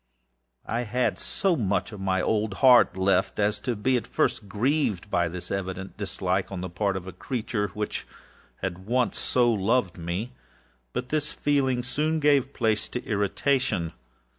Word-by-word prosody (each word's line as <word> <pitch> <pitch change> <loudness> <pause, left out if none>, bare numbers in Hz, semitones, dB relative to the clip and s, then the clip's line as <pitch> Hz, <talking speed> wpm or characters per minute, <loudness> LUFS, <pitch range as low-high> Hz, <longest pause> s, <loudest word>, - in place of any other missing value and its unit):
I 115 - -1
had 125 +2 0
so 190 -3 0
much 105 -4 0
of 105 - -8
my 95 -1 0
old 110 0 0
heart 125 -7 +6
left, 95 0 +2
as 105 0 +1
to 125 -3 -2
be 125 +5 +2
at 115 -1 -4
first 105 - 0
grieved 110 - 0
by 85 -1 +2
this 85 +1 -7
evident 95 0 -4
dislike 95 -2 -2
on 95 -2 -4
the 90 -1 -5
part 95 +2 0
of 95 - -7
a 95 - -6
creature 110 -4 -2
which 105 0 -3 0.6
had 95 0 -4
once 125 +1 +1
so 120 -2 +3
loved 100 -2 +1
me. 90 +9 -3 0.6
But 125 0 -4
this 150 0 0
feeling 135 -4 +1
soon 155 +5 0
gave 145 -3 +3
place 110 -6 0
to 125 - -4
irritation. 105 - 0
105 Hz, 165 wpm, -26 LUFS, 95-125 Hz, 0.6 s, heart